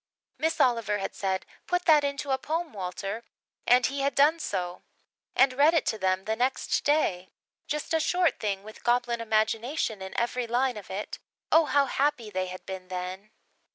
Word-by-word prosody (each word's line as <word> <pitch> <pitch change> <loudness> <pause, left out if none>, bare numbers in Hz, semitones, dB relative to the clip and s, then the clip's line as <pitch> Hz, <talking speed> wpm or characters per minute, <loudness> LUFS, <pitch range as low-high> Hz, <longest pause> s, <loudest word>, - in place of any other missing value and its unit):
Miss 320 +1 0
Oliver 230 -5 +2
had 195 - -4
said, 190 -1 -2 0.2
"Put 360 0 0
that 305 -3 +6
into 280 0 -2
a 265 - +1
poem, 320 +2 -3
Walter," 195 +3 -4 0.4
and 245 +1 +5
he 275 +2 -1
had 275 -1 0
done 300 +4 +5
so, 180 - -3 0.5
and 265 -1 +5
read 295 +5 +4
it 325 - +2
to 220 - -8
them 190 0 0
the 220 - 0
next 250 +3 0
day 195 -12 +1 0.4
just 300 +2 -3
a 320 - +3
short 345 -1 +1
thing 200 -2 -2
with 215 +1 -12
goblin 240 -1 +1
imagination 220 +1 0
in 190 0 -4
every 240 +1 -1
line 250 +2 +1
of 210 -2 -9
it. 200 +2 -5 0.3
Oh, 320 0 +6
how 285 -1 +3
happy 270 -5 0
they 185 -1 -1
had 185 0 -8
been 190 -1 -7
then! 185 +3 -5
240 Hz, 185 wpm, -28 LUFS, 195-285 Hz, 0.5 s, that